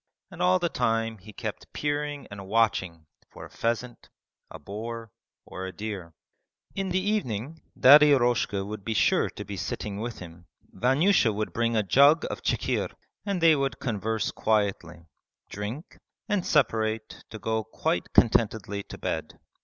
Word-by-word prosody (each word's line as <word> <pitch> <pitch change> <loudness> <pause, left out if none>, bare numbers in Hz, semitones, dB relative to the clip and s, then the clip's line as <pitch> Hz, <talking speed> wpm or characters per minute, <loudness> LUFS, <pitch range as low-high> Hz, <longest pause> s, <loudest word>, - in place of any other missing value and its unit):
And - - -8
all 180 +1 +4
the 175 -1 0
time 115 -5 -1
he 105 +4 -12
kept - - -7
peering 145 -1 -2
and 100 -2 -8
watching 95 -7 +1 0.2
for - - -11
a - - -15
pheasant, 120 +1 -3 0.4
a - - -9
boar, 110 +6 -7 0.3
or 95 0 -6
a - - -6
deer. 95 -4 -6 0.6
In 195 -1 -2
the 180 - 0
evening 160 - -2 0.2
Daddy 150 +3 +8
Eroshka 120 -7 +2
would 105 0 -7
be 110 +1 -2
sure - - +3
to 105 - -8
be 100 +1 -6
sitting 100 +2 -4
with 120 +1 -4
him. 85 -1 -12 0.3
Vanyusha 135 - +3
would 105 +1 -3
bring 115 0 0
a 110 - +2
jug 140 - +5
of - - -6
chikhir, - - -1 0.4
and 195 -3 -1
they 165 -1 +6
would 135 -1 -1
converse 110 -1 -2
quietly, 95 -6 -1 0.5
drink, 105 - -6 0.3
and 205 -5 0
separate 110 -6 0
to 110 - -7
go 110 +1 -1
quite 110 - -2
contentedly 110 -3 +2
to - - -10
bed. - - -4
115 Hz, 155 wpm, -27 LUFS, 105-140 Hz, 0.6 s, Daddy